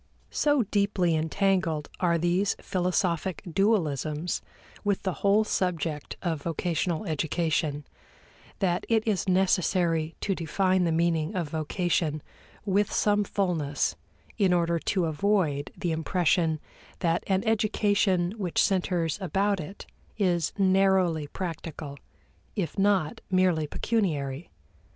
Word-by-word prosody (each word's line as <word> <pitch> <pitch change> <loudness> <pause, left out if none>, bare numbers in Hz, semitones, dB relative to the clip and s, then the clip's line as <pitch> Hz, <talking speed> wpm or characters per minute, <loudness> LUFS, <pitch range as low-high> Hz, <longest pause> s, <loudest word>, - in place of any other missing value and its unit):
So 290 -4 +2
deeply 200 -4 +1
entangled 165 -1 0
are 170 -2 +2
these 175 +4 +1
philosophic 180 0 -1
dualisms 165 - 0 0.4
with 205 -2 0
the 190 - -1
whole 205 +2 +4
subject 165 -7 -2
of 165 -5 -1
vocational 170 +1 -1
education, 155 -1 -1 0.7
that 180 -2 0
it 225 -1 +2
is 200 -2 0
necessary 180 -3 +2
to 200 - 0
define 185 +2 +1
the 165 - +1
meaning 165 +2 +1
of 170 -5 -2
vocation 155 -1 -1 0.4
with 205 +1 +1
some 210 0 +2
fullness 175 -8 -1 0.4
in 190 -3 +4
order 170 -1 +1
to 185 +1 0
avoid 160 -3 0
the 175 - -1
impression 160 0 +1 0.4
that 170 -1 +1
an 190 -1 +1
education 205 -4 +2
which 180 -4 -1
centers 180 -3 +1
about 195 +2 +1
it 175 +6 -8 0.3
is 175 -6 +1
narrowly 190 -5 +3
practical, 160 -4 -6 0.6
if 190 -6 -2
not 195 -6 +1
merely 185 -5 +2
pecuniary. 155 - -1
180 Hz, 115 wpm, -27 LUFS, 160-195 Hz, 0.7 s, whole